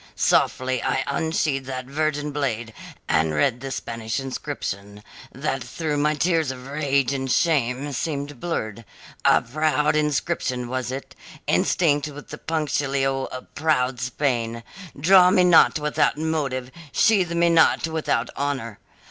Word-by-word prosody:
Softly 130 -1 +1
I - - 0
unsheathed 140 -2 -1
that 130 -1 -4
virgin 150 +1 -1
blade 120 -6 -2 0.3
and 80 -1 +1
read 115 +11 +1
the 135 - -5
Spanish 115 +1 -4
inscription, 105 -7 -5 0.3
that - - -3
through 155 -3 -3
my 150 +1 +2
tears 160 -1 +1
of 130 -1 -6
rage 140 -2 0
and 135 -1 -2
shame 140 -3 +1
seemed 145 -2 -3
blurred; 115 - -3 0.4
a - - +5
proud 150 +3 +1
inscription 135 -4 -1
was 130 -1 -2
it, 135 +1 -7 0.3
instinct 150 -4 +2
with 145 0 -10
the - - -8
punctilio 140 -4 -1
of 130 - -9
proud 130 -6 +1
Spain 120 -3 -1 0.4
'Draw 180 +4 +7
me 185 0 +4
not 175 -3 +6
without 150 -1 +1
motive, 140 -5 -2 0.2
sheathe 195 -7 +3
me 170 0 +3
not 165 0 +4
without 160 -1 -1
honour.' 135 -6 -3
140 Hz, 135 wpm, -23 LUFS, 125-155 Hz, 0.4 s, Draw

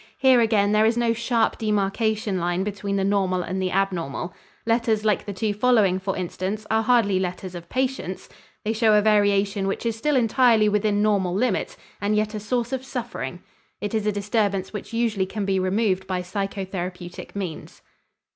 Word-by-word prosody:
Here 260 -2 +5
again 210 -3 +3
there 215 +1 +4
is 230 +1 +1
no 235 -1 +2
sharp 230 0 0
demarcation 210 -1 0
line 175 +2 0
between 200 0 -3
the 195 - +1
normal 190 -2 +1
and 190 +3 -3
the 185 - 0
abnormal. 180 -4 -1 0.3
Letters 225 -2 +1
like 210 -2 +1
the - - -2
two 205 +2 -1
following, 210 -4 +3
for 190 0 -3
instance, 190 +4 -3
are 220 0 +3
hardly 220 -5 +3
letters 185 0 -4
of 170 -1 -9
patients. 255 -8 -2 0.4
They 220 - +1
show 220 -1 +4
a 210 - +5
variation 205 -1 +2
which 195 - -3
is 230 -1 0
still 295 +6 0
entirely 235 -2 +4
within 210 0 +1
normal 195 -4 +1
limits 220 0 0 0.2
and 205 +1 +1
yet 215 0 0
a 215 - -3
source 240 +3 -2
of 260 -1 -2
suffering; 245 -3 -5 0.4
it 205 0 -4
is 215 -1 0
a - - +3
disturbance 205 -1 -1
which 210 - -6
usually 225 -5 0
can 205 +1 -3
be 190 -1 +1
removed 190 0 0
by 185 -1 -2
psychotherapeutic 185 -2 -5
means. 185 -6 -6
205 Hz, 180 wpm, -24 LUFS, 190-225 Hz, 0.4 s, Here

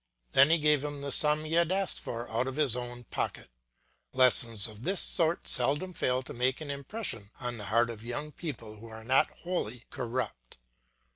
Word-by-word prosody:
Then 140 +2 +6
he 165 - +4
gave 150 -2 +2
him 145 -1 -5
the 140 0 -4
sum 150 +3 +4
he 155 - -5
had 170 +1 +2
asked 195 0 +1
for 120 0 -6
out 120 +3 0
of 130 - -5
his 145 -6 +2
own 120 0 -6
pocket. - - -4 0.6
Lessons 120 -5 +4
of 110 -1 -11
this 185 +7 +2
sort 170 -1 +2
seldom 170 +7 +3
fail 130 -4 0
to - - -9
make 130 +2 0
an 150 -2 -6
impression 140 - -5
on 120 -2 -4
the 105 - -5
heart 115 +3 +2
of 110 -1 -10
young 145 +6 -5
people 115 -10 -7
who 115 +2 -12
are 110 0 -10
not 130 +4 +3
wholly 125 -10 -3
corrupt. 120 - -5
130 Hz, 195 wpm, -29 LUFS, 115-150 Hz, 0.6 s, Then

